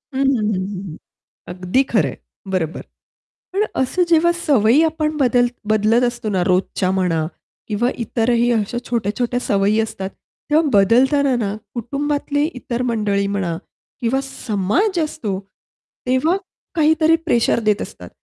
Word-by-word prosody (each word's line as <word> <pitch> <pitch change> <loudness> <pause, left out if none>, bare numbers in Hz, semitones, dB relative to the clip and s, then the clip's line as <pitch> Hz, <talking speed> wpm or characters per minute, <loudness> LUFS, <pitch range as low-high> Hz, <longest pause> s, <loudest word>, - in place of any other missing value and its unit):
हं, 270 - 0
हं, 270 -2 +3
हं, 215 -1 0
हं, 190 -1 -4
हं. - - -9 0.6
अगदी 185 +9 +1
खरं 220 - +3
आहे, - - -7 0.4
बरोबर. 170 -4 -2 0.7
पण 400 +3 +1 0.2
असं 310 +8 0
जेव्हा 340 +1 +4
सवयी 250 +1 +4
आपण 310 -1 -1
बदल 245 -3 +3 0.3
बदलत 215 +3 +3
असतो 240 -2 -2
ना 185 -2 +1
रोजच्या 185 0 +1
म्हणा 165 -4 +1 0.4
किंवा 225 +3 +1 0.2
इतरही 235 +2 +1
अशा 225 +1 -1
छोट्या-छोट्या 240 +2 -1
सवयी 205 0 +2
असतात. 195 -3 -4 0.4
तेव्हा 310 +1 +4
बदलताना 255 +7 +4
ना, 210 -3 -2 0.2
कुटुंबातले 285 +4 -1
इतर 245 -1 -3
मंडळी 205 -3 0
म्हणा 195 -5 -2 0.4
किंवा 255 +2 +1
समाज 270 - -1
असतो, 215 -11 -4 0.7
तेव्हा 260 +8 +2 0.4
काहीतरी 315 0 +4
प्रेशर 235 -5 +2
देत 210 - +2
असतात - - -9
235 Hz, 135 wpm, -20 LUFS, 200-280 Hz, 0.7 s, जेव्हा